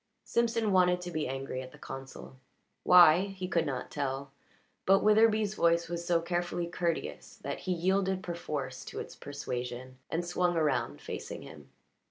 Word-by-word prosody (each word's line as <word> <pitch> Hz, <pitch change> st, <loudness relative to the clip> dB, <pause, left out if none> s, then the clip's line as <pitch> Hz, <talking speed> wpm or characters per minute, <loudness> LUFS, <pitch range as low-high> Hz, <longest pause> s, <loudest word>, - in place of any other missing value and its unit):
Simpson 230 Hz, -2 st, +1 dB
wanted 180 Hz, -1 st, +4 dB
to 175 Hz, 0 st, -6 dB
be 155 Hz, -2 st, -1 dB
angry 135 Hz, 0 st, -4 dB
at 130 Hz, 0 st, -9 dB
the -, -, -14 dB
consul 135 Hz, 0 st, -9 dB, 0.4 s
why 175 Hz, -2 st, +8 dB
he 190 Hz, -2 st, -5 dB
could 170 Hz, -3 st, +1 dB
not 130 Hz, -3 st, -4 dB
tell 135 Hz, -1 st, -3 dB, 0.6 s
but 195 Hz, +1 st, +5 dB
Witherbee's 215 Hz, -1 st, +4 dB
voice 170 Hz, -3 st, +2 dB
was 170 Hz, 0 st, -3 dB
so 170 Hz, -1 st, +2 dB
carefully 175 Hz, 0 st, -1 dB
courteous 170 Hz, -1 st, -3 dB
that -, -, -3 dB
he 185 Hz, -, -3 dB
yielded 190 Hz, +2 st, +1 dB
perforce 140 Hz, -7 st, -4 dB
to -, -, -6 dB
its -, -, -7 dB
persuasion 130 Hz, -2 st, -6 dB
and 170 Hz, +2 st, -1 dB
swung 175 Hz, 0 st, +1 dB
around, 145 Hz, -6 st, 0 dB
facing -, -, -6 dB
him. 75 Hz, -3 st, -12 dB
170 Hz, 160 wpm, -31 LUFS, 135-185 Hz, 0.6 s, why